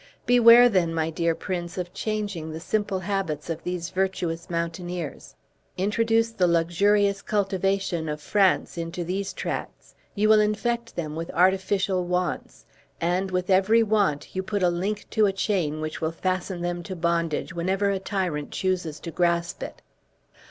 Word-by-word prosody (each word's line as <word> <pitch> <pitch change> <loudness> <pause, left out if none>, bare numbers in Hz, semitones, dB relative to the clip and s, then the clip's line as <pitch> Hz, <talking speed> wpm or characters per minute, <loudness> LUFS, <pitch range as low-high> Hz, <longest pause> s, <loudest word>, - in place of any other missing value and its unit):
Beware, 245 0 +8
then, 180 -7 +1
my 160 0 0
dear 165 0 0
prince, 175 -1 -4
of 180 -1 -4
changing 205 -7 -3
the 160 - -6
simple 195 +1 -1
habits 170 -5 -2
of 165 0 -5
those 180 -1 -4
virtuous 185 -3 -2
mountaineers. 170 -1 -4 0.4
Introduce 225 +4 +2
the 185 -5 +2
luxurious 195 +4 +2
cultivation 195 -4 -1
of 150 0 -3
France 190 0 +1
into 165 +1 -4
these 190 +3 -3
tracts, - - -5 0.2
you 210 +1 +2
will 215 0 +6
infect 230 +3 -1
them 155 -3 -4
with 165 +1 -5
artificial 190 0 +2
wants; 180 0 -3 0.3
and, 180 +3 0
with 185 0 -1
every 205 +5 +5
want, 200 -10 0
you 190 - 0
put 200 0 -2
a 180 - +5
link 195 +5 -2
to 215 -2 +4
a - - +2
chain 180 -7 -1
which 155 0 -4
will 160 0 0
fasten 185 +1 -2
them 175 0 -2
to 185 +2 -6
bondage 170 -1 -1
whenever 190 +4 0
a 195 - -1
tyrant 180 -7 -2
chooses 180 -5 -2
to 165 - -7
grasp 170 +1 0
it. - - -7
185 Hz, 160 wpm, -25 LUFS, 170-200 Hz, 0.4 s, Beware